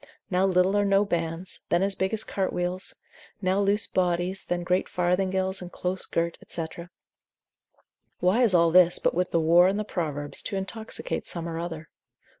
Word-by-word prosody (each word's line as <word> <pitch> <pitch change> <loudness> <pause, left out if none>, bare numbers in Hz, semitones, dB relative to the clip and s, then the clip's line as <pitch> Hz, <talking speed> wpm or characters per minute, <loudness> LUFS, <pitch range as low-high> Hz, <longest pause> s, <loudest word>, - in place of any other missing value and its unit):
now 185 +1 +3
little 185 +1 +2
or 205 - +3
no 200 0 +3
bands, 170 -1 -3
then 175 +2 +2
as 200 0 +1
big 190 0 -1
as 220 -1 0
cart 195 -2 -2
wheels; 180 +1 -3 0.4
now 190 0 +1
loose 205 +2 +2
bodies, 180 +1 -1
then 175 0 -2
great 180 +1 0
farthingales 190 +2 0
and 180 0 -8
close 185 +1 -1
girt, 170 0 -2
&c. 165 - -3 1.5
Why 185 +7 +2
is 220 -7 +4
all 170 -1 +4
this, 175 0 +6
but - - 0
with 180 +2 0
the 170 - +1
whore 170 +3 +5
in 195 - -1
the 215 - -1
Proverbs, 150 -7 0
to 205 - -4
intoxicate 220 +3 -4
some 170 -1 -3
or 165 -1 -4
other? 165 -2 -6
180 Hz, 180 wpm, -26 LUFS, 175-195 Hz, 1.5 s, this